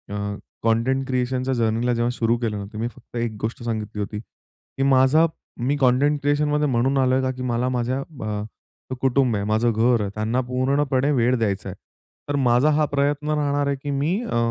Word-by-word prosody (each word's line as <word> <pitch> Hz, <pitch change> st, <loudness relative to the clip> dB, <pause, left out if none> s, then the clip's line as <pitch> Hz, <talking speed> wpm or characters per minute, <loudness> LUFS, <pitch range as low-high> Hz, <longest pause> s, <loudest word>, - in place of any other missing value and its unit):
अ, 100 Hz, 0 st, -3 dB, 0.3 s
content 115 Hz, +4 st, +1 dB
क्रिएशनच्या 130 Hz, 0 st, -1 dB
जर्नीला 115 Hz, +1 st, +1 dB
जेव्हा 120 Hz, 0 st, 0 dB
सुरू 115 Hz, -1 st, +1 dB
केलं 115 Hz, -3 st, -2 dB
ना, 100 Hz, -, -5 dB
तर -, -, -7 dB
मी 115 Hz, +2 st, -1 dB
फक्त 120 Hz, 0 st, -14 dB
एक 115 Hz, -2 st, -2 dB
गोष्ट 115 Hz, +2 st, -4 dB
सांगितली 110 Hz, -2 st, -4 dB
होती 105 Hz, +1 st, -4 dB
की 125 Hz, +4 st, -9 dB
माझा 135 Hz, +4 st, +5 dB, 0.4 s
मी 140 Hz, -, +2 dB
कंटेंट 135 Hz, +4 st, +3 dB
क्रिएशनमध्ये 150 Hz, +1 st, +1 dB
म्हणून 130 Hz, +1 st, +1 dB
आलो 130 Hz, -1 st, +3 dB
आहे 130 Hz, -, +2 dB
का 130 Hz, -, 0 dB
की 130 Hz, -, -6 dB
मला 125 Hz, 0 st, 0 dB
माझ्या 125 Hz, +1 st, -1 dB, 0.3 s
अ, 105 Hz, -1 st, -2 dB, 0.6 s
कुटुंब 130 Hz, -3 st, +2 dB
आहे 100 Hz, -, -2 dB
माझं 110 Hz, +3 st, +2 dB
घर 115 Hz, +1 st, +3 dB
आहे, 100 Hz, -, -2 dB
त्यांना 110 Hz, +4 st, 0 dB
पूर्णपणे 135 Hz, +2 st, +1 dB
वेळ 125 Hz, -1 st, +2 dB
द्यायचा 100 Hz, -4 st, -1 dB
आहे. 95 Hz, -, -7 dB, 0.5 s
तर 145 Hz, -, 0 dB
माझा 125 Hz, +1 st, +3 dB
हा 150 Hz, 0 st, +3 dB
प्रयत्न 145 Hz, +1 st, 0 dB
राहणार 145 Hz, -1 st, +1 dB
आहे 140 Hz, -, +1 dB
की 145 Hz, -, -2 dB
मी 150 Hz, +8 st, 0 dB
अ, 210 Hz, -, -2 dB
125 Hz, 195 wpm, -23 LUFS, 115-140 Hz, 0.6 s, माझा